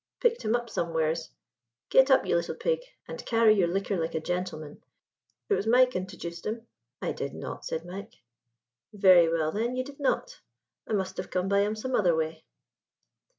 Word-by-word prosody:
'Picked 470 Hz, -1 st, +2 dB
him 220 Hz, +1 st, +1 dB
up, 240 Hz, 0 st, -2 dB
somewheres 160 Hz, -4 st, -1 dB, 0.6 s
Get 265 Hz, +1 st, +6 dB
up, 265 Hz, -, +5 dB
you -, -, +1 dB
little 170 Hz, -, -1 dB
pig, 485 Hz, -1 st, 0 dB, 0.3 s
and -, -, -7 dB
carry 225 Hz, -2 st, +4 dB
your 190 Hz, -5 st, +3 dB
liquor 195 Hz, +3 st, -1 dB
like 160 Hz, 0 st, -2 dB
a -, -, +1 dB
gentleman. 170 Hz, -3 st, -4 dB, 0.7 s
It -, -, +2 dB
was 220 Hz, -, 0 dB
Mike 250 Hz, +2 st, +5 dB
intojuced 180 Hz, -4 st, -5 dB
him." 225 Hz, +2 st, -4 dB, 0.4 s
"I -, -, 0 dB
did -, -, -5 dB
not," -, -, -7 dB
said 160 Hz, +1 st, -3 dB
Mike. 190 Hz, +3 st, -8 dB, 0.8 s
"Very 185 Hz, -5 st, +6 dB
well, 160 Hz, -1 st, +1 dB
then, 235 Hz, +6 st, -1 dB
ye 255 Hz, -, -1 dB
did 280 Hz, +2 st, -12 dB
not. -, -, -1 dB, 0.5 s
I -, -, -3 dB
must 190 Hz, -2 st, -1 dB
have -, -, -5 dB
come 185 Hz, 0 st, -1 dB
by 200 Hz, 0 st, +3 dB
him 210 Hz, +2 st, +1 dB
some 255 Hz, +4 st, -4 dB
other 180 Hz, -8 st, +3 dB
way." 160 Hz, 0 st, -2 dB
195 Hz, 185 wpm, -28 LUFS, 170-235 Hz, 0.8 s, Get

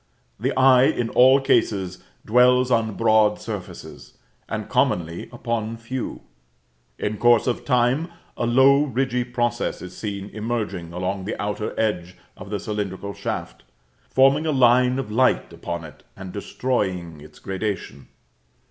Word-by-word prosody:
The -, -, 0 dB
eye 130 Hz, -1 st, +6 dB
in 120 Hz, -3 st, 0 dB
all 130 Hz, +2 st, +6 dB
cases 100 Hz, -9 st, 0 dB, 0.2 s
dwells 125 Hz, +2 st, +4 dB
on 110 Hz, -3 st, +1 dB
broad 110 Hz, -2 st, +3 dB
surfaces, 105 Hz, -5 st, -8 dB, 0.3 s
and -, -, -4 dB
commonly 85 Hz, -1 st, 0 dB
upon 115 Hz, -2 st, -3 dB
few. 120 Hz, +3 st, -5 dB, 0.8 s
In 105 Hz, 0 st, -3 dB
course 120 Hz, -2 st, +4 dB
of 125 Hz, -, -1 dB
time, 125 Hz, +4 st, +2 dB, 0.3 s
a 120 Hz, -, -1 dB
low 135 Hz, +3 st, +5 dB
ridgy 130 Hz, -3 st, 0 dB
process 120 Hz, -1 st, -2 dB
is 90 Hz, 0 st, -9 dB
seen 100 Hz, -2 st, -5 dB
emerging 105 Hz, -6 st, -4 dB
along 95 Hz, +2 st, -3 dB
the 105 Hz, -, -4 dB
outer 105 Hz, +1 st, -3 dB
edge 90 Hz, -5 st, -1 dB, 0.2 s
of 95 Hz, -, -11 dB
the 105 Hz, -1 st, -2 dB
cylindrical 100 Hz, -2 st, -4 dB
shaft, -, -, -5 dB, 0.5 s
forming 135 Hz, +4 st, +4 dB
a -, -, +2 dB
line 125 Hz, -1 st, +4 dB
of 130 Hz, -6 st, -4 dB
light 125 Hz, -6 st, +2 dB
upon 85 Hz, 0 st, -5 dB
it 75 Hz, -, -13 dB, 0.2 s
and 95 Hz, -2 st, -8 dB
destroying 95 Hz, -, -3 dB
its 75 Hz, +1 st, -15 dB
gradation. 95 Hz, -, -5 dB
110 Hz, 140 wpm, -23 LUFS, 95-125 Hz, 0.8 s, eye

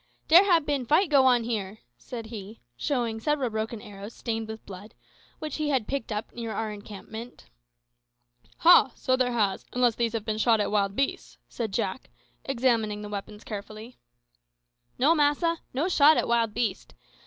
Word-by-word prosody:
"Dere 340 Hz, +4 st, +8 dB
hab 340 Hz, -6 st, +3 dB
bin 285 Hz, -3 st, -1 dB
fight 310 Hz, -, +2 dB
go 270 Hz, -2 st, +6 dB
on 245 Hz, -2 st, +4 dB
here," 215 Hz, -3 st, -3 dB, 0.2 s
said 230 Hz, -, -8 dB
he, 220 Hz, -1 st, -9 dB, 0.2 s
showing 235 Hz, -, -1 dB
several 275 Hz, -1 st, 0 dB
broken 220 Hz, +1 st, -3 dB
arrows, 205 Hz, +2 st, -10 dB
stained 225 Hz, -1 st, -3 dB
with 220 Hz, 0 st, -8 dB
blood, 200 Hz, +2 st, -11 dB, 0.4 s
which 305 Hz, -2 st, -5 dB
he 305 Hz, -1 st, -1 dB
had 260 Hz, -7 st, 0 dB
picked 275 Hz, -4 st, -3 dB
up 210 Hz, +1 st, -4 dB
near 230 Hz, -2 st, -5 dB
our 220 Hz, 0 st, -3 dB
encampment. 210 Hz, -, -10 dB, 1.1 s
"Ha! 330 Hz, -6 st, +6 dB
so 255 Hz, -, +1 dB
there 255 Hz, -1 st, 0 dB
has, 205 Hz, -5 st, 0 dB
unless 245 Hz, -1 st, +3 dB
these 230 Hz, 0 st, -1 dB
have 225 Hz, -2 st, -3 dB
been 215 Hz, -1 st, -2 dB
shot 225 Hz, -1 st, +4 dB
at 205 Hz, -, 0 dB
wild 200 Hz, -2 st, +1 dB
beasts," 275 Hz, +3 st, -2 dB
said 225 Hz, -4 st, -4 dB
Jack, 190 Hz, +5 st, -3 dB, 0.3 s
examining 230 Hz, -5 st, 0 dB
the 210 Hz, -, -7 dB
weapons 210 Hz, +1 st, -7 dB
carefully. 215 Hz, +3 st, -8 dB, 1.0 s
"No, 285 Hz, +6 st, +4 dB
massa; 320 Hz, +2 st, +2 dB
no 285 Hz, +7 st, -1 dB
shot 310 Hz, -3 st, +5 dB
at -, -, 0 dB
wild 230 Hz, -2 st, +1 dB
beast. 215 Hz, -6 st, -2 dB
230 Hz, 170 wpm, -27 LUFS, 215-270 Hz, 1.1 s, Dere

